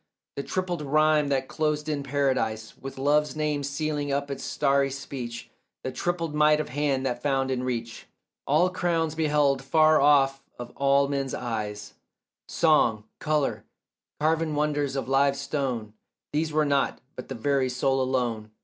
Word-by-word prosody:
The - - -2
tripled 180 +1 -3
rhyme 150 0 +3
that 135 -1 0
closed 150 0 -1
in 150 -2 -1
Paradise 130 -6 -1
With 135 0 -9
Love's 150 +3 +2
name 150 -1 -1
sealing 145 +1 -2
up 140 0 -1
its 135 - -5
starry 140 -1 +1
speech— 130 -3 -7 0.3
The 130 - -3
tripled 170 -1 -2
might 150 0 +4
of 155 - -3
hand 140 -1 0
that 120 -2 -2
found 135 -2 0
in 125 -1 -1
reach 115 -3 -4 0.4
All 165 +6 +3
crowns 165 -3 0
beheld 150 -3 +2
far 155 +2 +4
off 135 -1 +4 0.2
of 120 0 -8
all 140 0 +3
men's 140 -1 -2
eyes, 105 -3 -4 0.5
Song, 135 -10 +3 0.2
colour, 150 -2 0 0.6
carven 160 0 +1
wonders 145 -2 0
of 135 - -3
live 140 +1 +3
stone— 130 -7 -3 0.4
These 155 +1 0
were 155 0 +2
not, 140 -1 +1 0.2
but 125 - -8
the 135 - -4
very 135 +2 +1
soul 135 +1 +1
alone. 120 -4 -1
140 Hz, 155 wpm, -26 LUFS, 130-150 Hz, 0.6 s, might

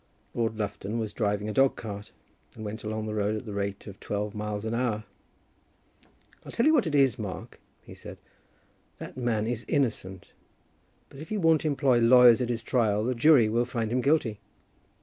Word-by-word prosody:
Lord 115 -2 -1
Lufton 100 +1 -4
was 110 -2 -3
driving 105 -1 -1
a 105 - -3
dog 135 +2 +3
cart, 105 -2 -8 0.4
and 110 - -8
went 105 +2 -6
along 110 0 -3
the 110 - -4
road 105 0 0
at 110 - -6
the 105 - -6
rate 100 0 -4
of 100 -2 -10
twelve 105 0 -3
miles 105 0 -4
an 110 - -2
hour. 115 -3 -1 1.4
"I'll - - -10
tell 235 - 0
you 310 - +5
what 250 - +3
it 150 - -1
is, 135 -6 +3
Mark," 100 -4 -7 0.2
he - - -12
said, - - -11 0.8
"that - - -9
man 120 -4 -1
is 115 0 -3
innocent; 110 - -2 0.8
but 135 - -13
if 155 - -9
he 215 - -2
won't 165 -4 +3
employ 140 -4 +2
lawyers 120 0 +7
at 125 - -1
his 115 -2 -3
trial, 110 -4 +1
the 125 +3 0
jury 125 -1 +5
will 115 +3 +1
find 115 -2 -3
him 125 +1 +1
guilty." 130 -7 +1
115 Hz, 190 wpm, -27 LUFS, 105-130 Hz, 1.4 s, lawyers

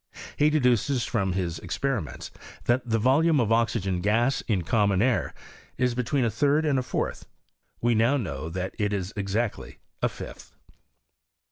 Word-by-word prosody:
He 150 +1 +4
deduces 125 -3 +2
from 95 -5 0
his 85 -3 -2
experiments, 120 - -3 0.3
that 120 +2 +2
the 115 - +2
volume 145 +7 +3
of 115 -3 +1
oxygen 110 -5 +1
gas, 115 +7 +2
in 100 -6 +1
common 100 +1 +2
air, 125 +3 +1 0.5
is 125 -1 +1
between 125 +2 0
a 115 - 0
third 145 +4 +2
and 140 -3 +2
a - - 0
fourth: - - -3 0.5
we 120 0 +3
now 115 +6 +3
know 80 - -4
that 90 +2 -4
it 105 -1 0
is 95 0 -3
exactly 100 +3 -2 0.2
a - - +2
fifth. - - -10
115 Hz, 155 wpm, -26 LUFS, 100-130 Hz, 0.5 s, He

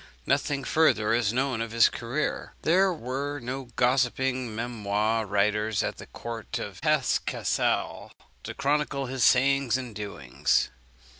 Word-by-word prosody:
Nothing 140 -1 0
further 115 -9 +3
is 115 -3 +2
known 130 -1 0
of 115 - -3
his 115 +1 +5
career. 125 +6 -3
There 185 +4 +4
were 140 -1 -3
no 130 +2 -5
gossipping 125 -1 +1
memoir 110 -1 -1
writers 105 +1 +1
at - - -3
the - - -10
court 115 -2 -6
of - - -6
Hesse - - +2
Cassel - - -1 0.3
to - - -7
chronicle 140 -1 0
his 130 -1 -2
sayings 135 -1 +4
and 125 -3 -6
doings. 100 -12 -1
125 Hz, 135 wpm, -27 LUFS, 110-135 Hz, 0.3 s, his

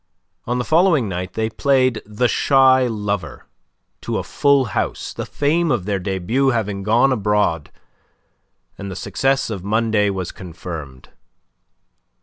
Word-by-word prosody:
On 120 +1 0
the 125 - -1
following 160 - +3
night 90 0 -5
they 110 0 -1
played 130 0 +1
"The 105 +4 0
Shy 130 -1 +4
Lover" 105 - -4 0.6
to - - -3
a - - -2
full 140 -2 +2
house, - - -2
the - - -6
fame 160 +4 0
of 120 -10 0
their 100 -1 -1
debut 95 +8 -1
having 105 -5 -1
gone 115 +7 +3
abroad, 105 - 0 1.1
and 100 0 -6
the 95 - -6
success 135 +3 0
of 95 -4 -5
Monday 110 0 +1
was 95 -3 -4
confirmed. 80 -7 -9
110 Hz, 135 wpm, -20 LUFS, 95-130 Hz, 1.1 s, Shy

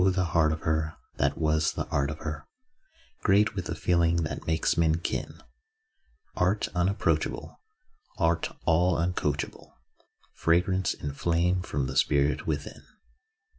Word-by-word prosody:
the 95 0 +1
heart 80 -2 +4
of 80 - -3
her, 80 0 -1 0.2
That - - +1
was 80 -1 +1
the - - -3
art 70 0 +1
of 75 - -5
her. 75 -2 -5 0.7
Great 105 +1 +3
with 95 -3 -4
the 80 - -3
feeling 85 +1 +2
that 80 - -5
makes 80 0 +1
men 80 -1 +3
kin. 85 - -4 1.0
Art 95 +4 +1
unapproachable, 90 +4 -1 0.6
Art 85 -3 +1 0.2
all 85 +2 +3
uncoachable, 80 -4 -2 0.6
Fragrance 90 +2 +1
and 70 -1 -5
flame 85 +3 +1
from 70 -6 -2
the 65 +1 -4
spirit 70 0 +2
within. 75 -2 -3
80 Hz, 135 wpm, -28 LUFS, 75-90 Hz, 1.0 s, heart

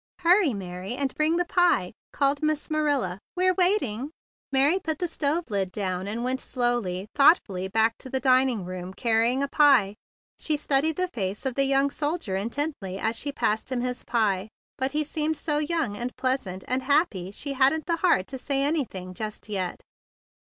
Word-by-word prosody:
"Hurry, 350 - +4
Mary, 185 +3 -5
and 275 0 -1
bring 310 +2 +1
the 355 +1 +1
pie," 345 - +2 0.2
called 280 0 +1
Miss 310 0 -1
Marilla. 285 -12 0 0.2
"We're 370 0 +3
waiting." 345 - +1 0.4
Mary 280 +7 +3
put 320 -4 -3
the 355 - -1
stove 310 -2 -1
lid 195 -2 -1
down, 185 -1 -3
and 225 +3 -3
went 255 +1 -1
slowly, 240 -7 -1
thoughtfully 205 - +4
back 220 +3 +2
to 260 - -9
the 265 0 -1
dining 255 -5 +3
room 185 +1 -7
bearing 235 +3 +2
a - - 0
pie. 275 -9 +4 0.5
She 305 -2 0
studied 290 +2 +1
the 365 +2 0
face 200 +2 -3
of 265 - 0
the 275 +2 +3
young 275 +1 +2
soldier 295 - -2
intently 220 -2 -3
as 220 +3 -1
she 285 +5 -3
passed 220 -2 -1
him 250 -2 -1
his 250 0 -3
pie, 210 -4 0 0.3
but 265 +1 -2
he 305 +1 +1
seemed 310 +1 -1
so 295 -1 0
young 305 -8 -1
and 240 +3 -3
pleasant 255 -8 -2
and 255 +1 +1
happy 260 - +1
she 275 +8 -4
hadn't 275 +4 +3
the 335 -1 0
heart 335 - +2
to 265 - -5
say 275 +1 0
anything 240 - -2
just 215 +3 -6
yet. 185 -4 -3
265 Hz, 180 wpm, -26 LUFS, 205-300 Hz, 0.5 s, Hurry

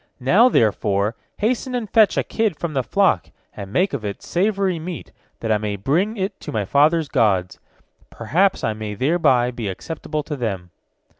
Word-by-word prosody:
Now, 190 - +5
therefore, 105 - +1 0.2
hasten 250 +3 -1
and 235 -3 -2
fetch 215 0 +4
a - - +2
kid 220 -8 -1
from 170 -3 -4
the 135 - +1
flock, 185 - +1 0.3
and 100 -1 -8
make 185 - +1
of 135 -6 -3
it 100 -1 -5
savory 195 -1 0
meat, 170 +1 -7 0.3
that 115 - -1
I 105 - +3
may 105 -1 -3
bring 170 - 0
it 190 +1 -3
to - - -7
my 105 -3 -1
father's 150 - +3
gods, 100 -9 +1 0.5
perhaps 190 +6 0
I 110 - 0
may 105 -1 -6
thereby 130 - +2
become 115 -5 -4
acceptable 155 - -5
to 150 - -5
them." 95 -9 -4
145 Hz, 175 wpm, -21 LUFS, -, 0.5 s, Now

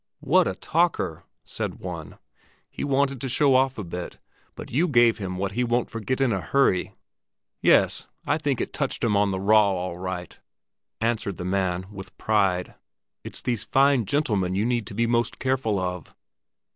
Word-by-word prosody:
"What - - +3
a - - -2
talker!" 160 - 0 0.2
said - - -4
one. - - -7 0.5
"He - - -5
wanted 140 -2 +1
to 135 - -3
show 140 +2 +3
off 130 +1 +3
a 105 - -4
bit, 90 0 -6 0.4
but - - -9
you 160 +9 +2
gave 120 -6 +4
him 95 -2 -4
what 100 +1 -2
he 120 +5 0
won't 120 0 0
forget 115 +4 -2
in 130 -4 +2
a 95 - -1
hurry." 95 +1 +1 0.7
"Yes, - - +3 0.2
I - - +1
think 145 -4 -1
it - - -3
touched - - -2
him 110 -3 +2
on 100 0 +3
the 95 -1 -2
raw, 105 +1 +5
all 90 -1 -4
right," 90 -1 -5 0.6
answered 110 -4 -1
the 90 - -5
man, 95 -1 -1
with 95 -2 -10
pride. 95 -4 +1 0.5
"It's - - -6
these 120 -4 -1
fine 135 -3 +3
gentlemen 105 -9 0
you 100 +3 +1
need 120 -2 0
to - - -7
be 115 +2 +2
most 120 0 0
careful 130 -6 0
of." 90 -2 -5
110 Hz, 180 wpm, -25 LUFS, 95-130 Hz, 0.7 s, raw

